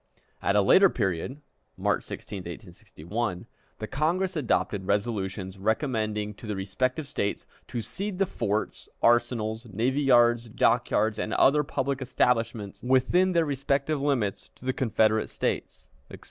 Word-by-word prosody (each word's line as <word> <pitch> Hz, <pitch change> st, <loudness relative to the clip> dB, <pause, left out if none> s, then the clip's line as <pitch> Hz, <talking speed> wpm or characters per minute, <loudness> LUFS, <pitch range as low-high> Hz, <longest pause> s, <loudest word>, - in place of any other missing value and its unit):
At 100 Hz, -, +1 dB
a 105 Hz, -, +5 dB
later 190 Hz, -, +6 dB
period 105 Hz, -, -2 dB, 0.4 s
(March -, -, 0 dB
16, 100 Hz, -, -7 dB
1861) 90 Hz, +2 st, -5 dB, 0.3 s
the 110 Hz, -, -4 dB
Congress 175 Hz, -, 0 dB
adopted 105 Hz, -, 0 dB
resolutions 100 Hz, -2 st, -2 dB
recommending 110 Hz, -2 st, -1 dB
to 110 Hz, -, -11 dB
the 105 Hz, -, -2 dB
respective 130 Hz, +10 st, -1 dB
States 105 Hz, -7 st, -2 dB, 0.2 s
to 115 Hz, -, -4 dB
"cede 195 Hz, -, -4 dB
the 195 Hz, -, +2 dB
forts, 110 Hz, -, -3 dB
arsenals, 120 Hz, -1 st, +2 dB
navy 125 Hz, +8 st, 0 dB
yards, 120 Hz, -3 st, +4 dB
dock 120 Hz, +1 st, +2 dB
yards, 110 Hz, +1 st, +1 dB
and 110 Hz, -, -2 dB
other 150 Hz, +2 st, +4 dB
public 140 Hz, -1 st, -2 dB
establishments 115 Hz, -5 st, 0 dB
within 130 Hz, +9 st, +3 dB
their 170 Hz, -1 st, +3 dB
respective 140 Hz, +1 st, 0 dB
limits 125 Hz, -9 st, -1 dB
to -, -, -14 dB
the 130 Hz, -, +1 dB
Confederate 110 Hz, -3 st, +1 dB
States," 70 Hz, -1 st, -3 dB, 0.2 s
etc. -, -, -10 dB
115 Hz, 140 wpm, -27 LUFS, 105-135 Hz, 0.4 s, later